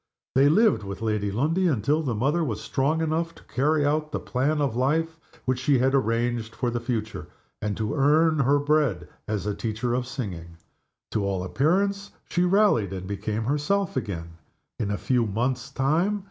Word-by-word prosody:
They 135 +2 +5
lived 210 - +4
with 100 +2 -6
Lady 105 -2 0
Lundie 160 - +1
until 145 +2 +1
the 130 -7 -2
mother 145 +10 +1
was 115 -9 -2
strong 150 +5 0
enough 165 +1 -1
to - - -17
carry 150 +2 +1
out 150 +1 0
the - - -2
plan 140 +5 0
of 140 -6 0
life 160 +6 0 0.3
which 130 -1 0
she 135 +1 +3
had 130 +2 +2
arranged 115 -2 0
for 125 -2 -1
the 120 - -1
future, 115 -3 -4 0.3
and 105 -1 -2
to 110 -1 -2
earn 155 +3 +3
her 140 +2 +4
bread 145 - +1 0.2
as 105 -2 -2
a 105 - -1
teacher 115 +3 -2
of 125 0 -1
singing. 90 - -6 0.5
To 105 - 0
all 95 -2 -1
appearance 195 - 0
she 175 - 0
rallied, 180 - +3
and 95 -1 -5
became 105 +3 -3
herself 150 - 0
again, 85 -9 -4 0.4
in 105 -4 -1
a 105 - -1
few 125 -3 +1
months' 125 +5 -1
time. 160 +10 +1
130 Hz, 180 wpm, -25 LUFS, 110-155 Hz, 0.5 s, They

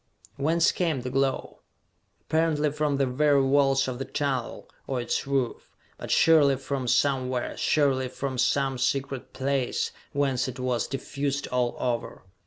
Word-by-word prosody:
Whence 160 +4 +2
came 165 -7 -1
the 125 +1 -5
glow? 135 0 -1 0.6
Apparently 155 -2 +1
from 150 -1 0
the 135 - +2
very 140 +2 +3
walls 135 0 +3
of 130 -1 -4
the 135 - -3
tunnel, 135 -2 -3 0.2
or 130 -2 -1
its 120 +2 -2
roof; 135 -3 -2 0.2
but - - -7
surely 150 -4 +5
from 130 -1 -4
somewhere, 125 0 +1
surely 135 -3 +1
from 130 0 -4
some 135 +1 +1
secret 135 +1 -2
place, 135 -1 -1 0.2
whence 135 -3 0
it 130 - -6
was 125 -3 -1
diffused 140 +1 -3
all 125 -1 0
over. 120 -2 -3
135 Hz, 145 wpm, -26 LUFS, 130-140 Hz, 0.6 s, surely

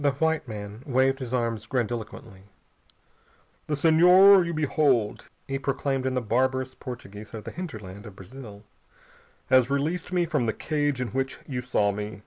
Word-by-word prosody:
The 140 -1 +3
white 160 +1 0
man 105 0 -7
waved 135 +1 +2
his 125 -3 -6
arms 115 -3 -1
grandiloquently. 115 -5 -4 1.2
"The 150 - 0
Senhor 180 +5 +7
you 170 - -3
behold," 145 -8 +1 0.2
he 135 0 -2
proclaimed 135 -1 -1
in 130 - -1
the 125 - 0
barbarous 130 +3 0
Portugese 110 -4 -9
of 110 - -7
the - - -7
hinterland 105 - -8
of 100 - -12
Brazil, 105 0 -11 0.9
"has 130 -1 +5
released 155 +6 -1
me 180 -1 +2
from 150 -7 0
the 110 - 0
cage 145 -3 -1
in 125 - -2
which 135 +3 -2
you 125 -3 -3
saw 105 -5 +1
me. 105 +1 -6
130 Hz, 160 wpm, -26 LUFS, 110-145 Hz, 1.2 s, Senhor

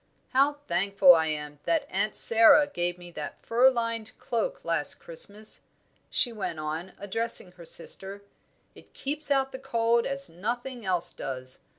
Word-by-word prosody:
How 275 +3 +3
thankful 185 +1 +5
I 160 -1 +2
am 150 -1 -5
that 320 -4 +1
Aunt 215 - -1
Sara 230 +6 +6
gave 175 -11 -3
me 175 0 -12
that - - -7
fur 245 +3 +5
lined 230 -3 -3
cloak - - -3
last - - +1
Christmas!" 470 - -2 0.5
she 240 - +2
went 195 -6 -4
on, 155 +4 -5
addressing 205 -1 -2
her 175 -1 -14
sister. 195 +4 -1 0.5
"It - - -18
keeps 290 +2 -3
out 270 -1 +2
the 260 - -7
cold 235 -3 +1
as 275 0 +1
nothing 235 +6 -5
else 180 -2 0
does. 130 -1 -5
220 Hz, 155 wpm, -27 LUFS, 175-265 Hz, 0.5 s, Sara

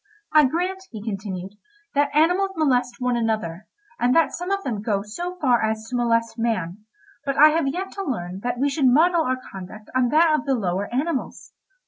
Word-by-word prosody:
"I 305 -1 +7
grant," 360 +7 -1
he 215 -2 -8
continued, 195 -3 -5 0.4
"that 285 0 +2
animals 355 +6 +3
molest 250 -6 +1
one 250 0 0
another, 215 -6 -2 0.3
and 245 +1 +2
that 330 - +4
some 355 +2 -5
of 395 0 -1
them 220 -6 -3
go 205 -2 -1
so 345 - -5
far 255 -10 +2
as 220 0 -2
to - - -2
molest 230 -1 0
man, 210 -3 -2 0.4
but 275 0 -2
I 305 +2 +9
have 315 -2 +1
yet 370 +7 -3
to 395 - -5
learn 185 - -4
that 245 +3 -3
we 275 +3 +1
should 280 -1 +2
model 330 +7 +4
our 255 -4 0
conduct 195 +3 -10
on 255 -1 +2
that 315 +3 +4
of 290 -5 -1
the 270 - +2
lower 195 -2 -2
animals. 270 +3 -3
250 Hz, 195 wpm, -23 LUFS, 220-310 Hz, 0.4 s, I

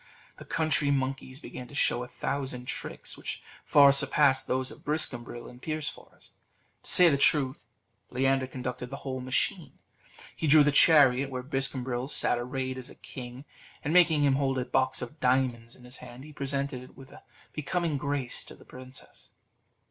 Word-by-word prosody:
The - - -11
country 155 -3 0
monkeys 135 -1 -2
began 125 -4 -9
to 145 - -13
show 120 -3 +2
a 125 - -6
thousand 130 -1 -4
tricks, - - -5
which - - -6 0.2
far 140 -1 +6
surpassed 140 -1 +3
those 130 0 -1
of - - -13
Briscambril 120 -6 -2
and 125 0 -14
Pierceforest. 155 0 -6 0.5
To - - -10
say 180 - +8
the 140 -3 +1
truth, 140 -2 +2 0.4
Leander 135 +1 +1
conducted 125 -1 -6
the 135 - -6
whole 130 -1 -4
machine. 140 +4 -1 0.6
He 160 - -2
drew 150 +1 +7
the 145 - +3
chariot 140 -3 +6
where 130 -1 -5
Briscambril 130 -2 -2
sat 120 - +2
arrayed 130 +1 -4
as 125 - -7
a - - -13
king, 125 +1 -10 0.4
and 150 - -1
making 165 -4 +5
him 135 -2 +3
hold 135 -1 0
a 125 - -1
box 130 -1 0
of 150 +6 -10
diamonds 125 -2 0
in 125 - -18
his 125 +1 -11
hand, 125 +2 -11
he 150 +1 -12
presented 140 -2 -3
it 125 - -15
with 135 -1 -13
a - - -14 0.3
becoming 155 0 -2
grace 140 -3 -2
to - - -11
the - - -19
princess. 130 +1 -11
135 Hz, 175 wpm, -28 LUFS, 125-145 Hz, 0.6 s, say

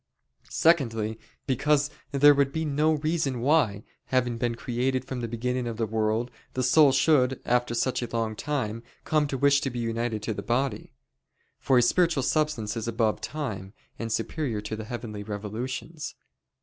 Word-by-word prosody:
Secondly, 115 -9 +2 0.3
because 145 +2 +2 0.2
there 145 +1 +7
would 140 -1 +2
be 160 +2 -2
no 150 +2 +2
reason 155 -4 -1
why, 120 -7 +2 0.2
having 125 -2 0
been 120 -1 0
created 130 +2 -1
from 130 -2 -5
the 115 - -2
beginning 125 +2 -2
of 115 -2 -4
the 115 - 0
world, 110 +2 0 0.2
the 130 - 0
soul 140 +2 +6
should, 130 -2 +3
after 120 -1 +1
such 125 +2 0
a 120 - -4
long 115 -2 -1
time, 115 -4 -2 0.2
come 155 -1 +2
to 135 - -3
wish 140 +1 +4
to 135 - -1
be 125 - -7
united 115 -2 -2
to 110 - -1
the - - -5
body. 120 0 -2 0.6
For 130 - +3
a 120 - +5
spiritual 160 +1 +2
substance 135 -8 0
is 115 0 -4
above 115 -2 0
time, 110 -11 -5 0.3
and 115 -1 -3
superior 115 0 -2
to 105 +1 -4
the 110 0 -6
heavenly 110 -3 -6
revolutions. 110 +9 -5
125 Hz, 170 wpm, -27 LUFS, 115-140 Hz, 0.6 s, there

